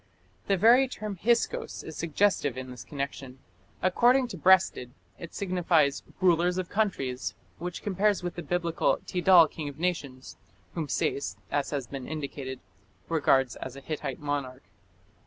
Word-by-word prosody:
The 195 - +2
very 240 +7 +6
term 215 -5 -6
Hyksos 235 +5 0
is 160 - -8
suggestive 165 -5 +1
in 130 0 -6
this 125 -2 -9
connection. 140 -2 -6 0.5
According 245 +7 +4
to 220 - -6
Breasted 180 -8 +4 0.3
it 170 - -9
signifies 175 -7 +1 0.2
"rulers 175 0 +3
of 185 -1 -3
countries", 155 -12 -1 0.2
which 175 +1 -5
compares 205 0 +1
with 175 -1 -3
the 175 - -6
Biblical 170 +1 0
"Tidal 180 -2 +6
king 150 -1 -6
of 140 - -11
nations", 150 -7 -3 0.4
whom 160 -4 -3
Sayce, 140 - -1
as 145 -1 0
has 140 -4 -3
been 135 +1 -7
indicated, 140 -4 -5 0.5
regards 135 -6 +2
as 130 - -7
a - - -8
Hittite 140 -2 -5
monarch. 140 -3 -3
165 Hz, 145 wpm, -28 LUFS, 140-185 Hz, 0.5 s, very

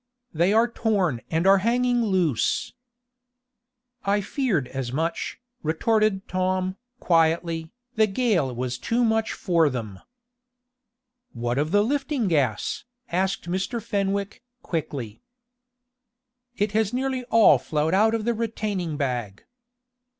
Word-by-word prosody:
"They 170 +4 +2
are 225 +2 +4
torn 195 - 0
and 165 +2 0
are 195 0 +6
hanging 245 +3 +2
loose." 180 - 0 1.3
"I 200 +1 +2
feared 205 - -1
as 130 -3 -4
much," 160 +5 -2 0.2
retorted 195 +5 +1
Tom, 185 0 -1 0.2
quietly, 165 -1 +1 0.3
"The 220 0 +5
gale 195 - +1
was 125 +1 -3
too 235 - 0
much 225 -1 +1
for 170 -5 +2
them." 110 -7 -5 1.3
"What 120 +2 -2
of 150 +1 0
the 205 +4 +3
lifting 275 -1 -1
gas?" 135 -10 0 0.3
asked 185 0 -1
Mr. 190 +7 -2
Fenwick, 200 -2 -2 0.2
quickly. 140 - -4 1.4
"It 205 0 0
has 215 -1 +1
nearly 260 0 -1
all 225 - +6
flowed 155 +5 -1
out 220 +3 +4
of 220 -2 -3
the 235 - +2
retaining 210 -8 -3
bag." 120 -8 -3
190 Hz, 120 wpm, -25 LUFS, 155-220 Hz, 1.4 s, are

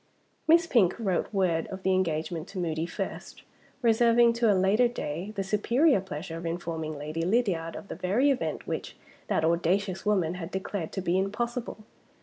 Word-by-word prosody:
Miss 335 +1 +6
Pink 210 - +3
wrote 195 -6 -1
word 180 -5 +1
of 190 0 -8
the 190 - +2
engagement 165 -2 -1
to 195 - -10
Moody 165 -2 -1
first; - - -6 0.4
reserving 235 0 +5
to 230 -2 +3
a 195 - +3
later 200 +6 +4
day 185 -4 -5
the 195 - -1
superior 235 - +3
pleasure 165 -2 -6
of 170 - -7
informing 165 -2 -4
Lady 155 +3 -4
Lydiard 180 -4 0
of - - -8
the - - -5
very 200 - +2
event 265 - -2
which - - -5 0.3
that 160 - +1
audacious 180 +3 +1
woman 190 -6 +1
had 180 -2 -6
declared 190 -3 -4
to 190 - -2
be 180 +1 +1
impossible. 230 +3 -3
190 Hz, 170 wpm, -28 LUFS, 165-220 Hz, 0.4 s, Miss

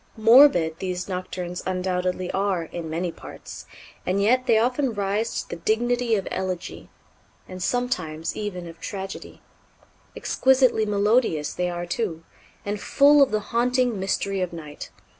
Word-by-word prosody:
Morbid 220 - +6
these 180 -1 -3
Nocturnes 180 -1 -5
undoubtedly 185 0 -2
are 190 -3 0
in 165 0 -7
many 170 +2 -2
parts, - - -11 0.4
and 185 +2 0
yet 250 +5 +2
they 225 - +5
often 250 +1 +1
rise 205 +3 -1
to - - -22
the - - -4
dignity 240 +4 +1
of 195 - -2
elegy, 185 -2 -4 0.6
and 185 0 -8
sometimes 175 -10 -2
even 185 -5 -5
of 165 0 -11
tragedy. 195 0 -7 0.7
Exquisitely 260 -4 +2
melodious 205 - +1
they 180 0 -1
are, 175 0 -4
too, 175 -3 -3 0.4
and 205 0 -3
full 290 +1 +5
of 275 - +5
the 215 - 0
haunting 245 -2 +1
mystery 195 0 -1
of 180 - -2
night. 155 -3 -9
195 Hz, 140 wpm, -24 LUFS, 180-230 Hz, 0.7 s, Morbid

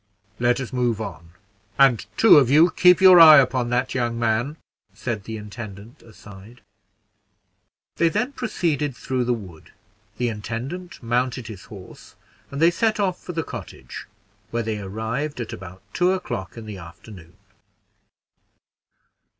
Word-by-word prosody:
"Let 120 +1 +2
us 130 -1 -6
move 120 -3 0
on; 90 -6 -7 0.5
and 135 -5 +4
two 220 -9 +8
of 130 -4 +1
you 155 +5 +5
keep 180 0 +5
your 185 -2 +8
eye 155 -2 +10
upon 130 -2 +2
that 125 +2 -1
young 120 -2 -1
man," 120 +6 -1 0.4
said 110 -5 -5
the 110 -1 -6
intendant 105 +3 -10
aside. 105 +1 -15 1.4
They 170 - +3
then 215 - -1
proceeded 160 - -2
through 125 +3 -2
the 125 - +1
wood; 90 -8 -12 0.5
the 125 - -1
intendant 120 - -6
mounted 125 +1 -1
his 105 -4 -10
horse, 95 -3 -13 0.3
and 140 - -6
they 165 +2 +5
set 215 +4 0
off 185 -3 -1
for 180 - -7
the 165 -1 -2
cottage, 115 - -9 0.4
where 115 0 -2
they 110 -1 -3
arrived 110 +9 -4
at 120 - -5
about 95 +1 -10
two 180 +1 +2
o'clock 100 - -5
in 115 - -8
the 105 -3 -8
afternoon. 85 +1 -13
120 Hz, 145 wpm, -22 LUFS, 110-150 Hz, 1.4 s, eye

